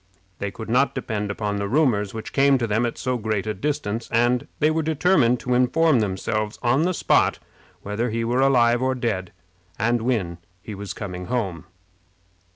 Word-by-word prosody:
They 100 - -2
could 110 +3 -8
not 130 +5 +2
depend 110 -5 -3
upon 100 0 -2
the 100 0 -2
rumors 110 -6 +2
which 110 -1 -7
came 140 0 +4
to 120 - -1
them 115 +2 +1
at 115 - -6
so 125 -1 -2
great 110 -2 -2
a 110 - -1
distance, 115 -2 -3
and 120 +1 +2
they 155 +1 +3
were 160 +1 0
determined 150 -5 +2
to 125 - -1
inform 130 +3 +3
themselves 105 +1 -2
on 125 +4 +3
the 180 +3 +1
spot - - +2 0.5
whether 105 +4 -2
he 115 +1 -2
were 120 +3 +1
alive 120 -3 +4
or 130 0 +1
dead, 105 -8 -2 0.5
and 120 +2 +1
when 105 -9 -1 0.2
he 105 +4 -8
was 100 -2 -6
coming 90 -3 -6
home. 100 -10 -2
115 Hz, 180 wpm, -23 LUFS, 105-130 Hz, 0.5 s, came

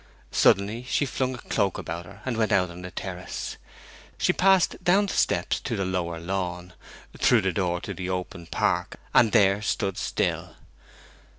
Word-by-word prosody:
Suddenly 105 +5 +3
she 145 - +2
flung 130 -1 -2
a - - -8
cloak 100 -5 -1
about 85 +2 -5
her 100 +3 -14
and 130 -2 -1
went 110 -2 +1
out 90 -2 +2
on 90 +1 -9
the 90 - -7
terrace. 90 -1 -6 0.6
She - - +2
passed 190 -1 +3
down 190 +3 +4
the 200 - -4
steps - - +1
to - - -3
the 95 - -1
lower 85 -3 -2
lawn, 90 0 -3 0.5
through 120 -3 +5
the 95 -2 0
door 90 -2 0
to - - -5
the 90 -1 -5
open 90 -2 -4
park, - - 0 0.2
and 115 - +5
there 100 -2 +4
stood 100 -2 -1
still. - - -2
95 Hz, 175 wpm, -26 LUFS, 90-115 Hz, 0.6 s, through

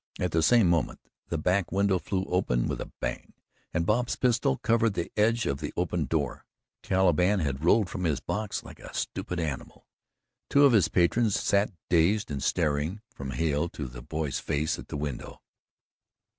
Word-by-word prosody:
At 90 -2 0
the 80 - +2
same 110 +5 +5
moment, 85 -3 +1 0.3
the 85 - -2
back 90 +4 +1
window 100 -1 +2
flew 95 +1 -2
open 60 -10 0
with - - -3
a - - -7
bang - - -4 0.4
and 85 0 0
Bob's 120 +5 +1
pistol 120 - +1
covered 115 -1 +2
the 85 - -3
edge 115 +2 +2
of 70 0 -1
the - - -4
opened 85 -5 -1
door. 75 -6 -2 0.3
"Caliban" 95 +1 +3
had 70 -1 -2
rolled 100 +4 +4
from 90 0 -4
his 75 -4 +1
box 105 -1 -3
like - - -12
a - - -10
stupid 90 - -3
animal. 75 -5 -5 0.6
Two 145 0 +6
of 135 - +5
his 100 -7 +5
patrons 105 +5 +2
sat 100 +1 +2 0.2
dazed 90 +3 +2
and 70 -2 -3
staring 75 +10 0
from 70 -1 -6
Hale 80 +3 0
to 75 - -6
the - - -8
boy's 75 +3 -3
face 75 +2 -1
at - - -9
the - - -5
window. 70 -3 -5
90 Hz, 180 wpm, -28 LUFS, 75-105 Hz, 0.6 s, Two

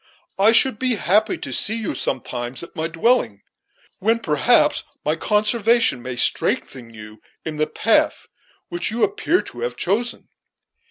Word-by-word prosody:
I 205 +3 +6
should 230 -1 +3
be 255 -2 +1
happy 205 +5 +1
to - - -7
see 220 - +2
you 225 -3 -3
sometimes 120 +2 -4
at 170 - -12
my 160 0 -2
dwelling, 165 - 0 0.6
when, 225 +4 +2
perhaps, 150 -10 +2 0.2
my 150 +1 +1
conversation 215 - +2
may 125 0 -6
strengthen 120 0 -1
you 105 -1 -13 0.2
in 155 -1 -5
the 155 0 0
path - - +1 0.4
which 175 0 -1
you 230 +1 -2
appear 400 -3 +1
to 120 - -11
have 120 +1 -4
chosen. 225 - -2
180 Hz, 150 wpm, -21 LUFS, -, 0.6 s, I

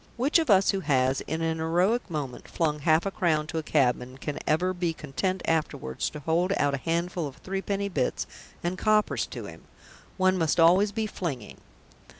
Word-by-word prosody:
Which 280 +7 +3
of 320 -5 -1
us 195 -1 +5
who 195 - -1
has, 135 -5 +1
in 160 +1 -2
an 160 0 -1
heroic 180 +9 +1
moment, 145 -6 -5
flung 150 -3 -1
half 155 +3 +3
a 195 - -1
crown 160 -5 +1
to 160 +1 -3
a - - -2
cabman 130 -4 0
can 145 +1 -4
ever 180 +4 +2
be 175 -2 -1
content 175 +5 -3
afterwards 155 - -1
to 150 - -9
hold 170 +5 +1
out 145 -1 +2
a - - 0
handful 170 +2 -1
of 140 - -10
three 195 +1 -4
penny 200 0 -2
bits 145 -10 -1 0.4
and 180 +2 -2
coppers 215 -1 +2
to - - -7
him? - - -11 0.5
One 185 0 +3
must 160 0 +1
always 185 +5 +5
be 220 +1 -2
flinging. 145 - -5
165 Hz, 190 wpm, -27 LUFS, 150-190 Hz, 0.5 s, us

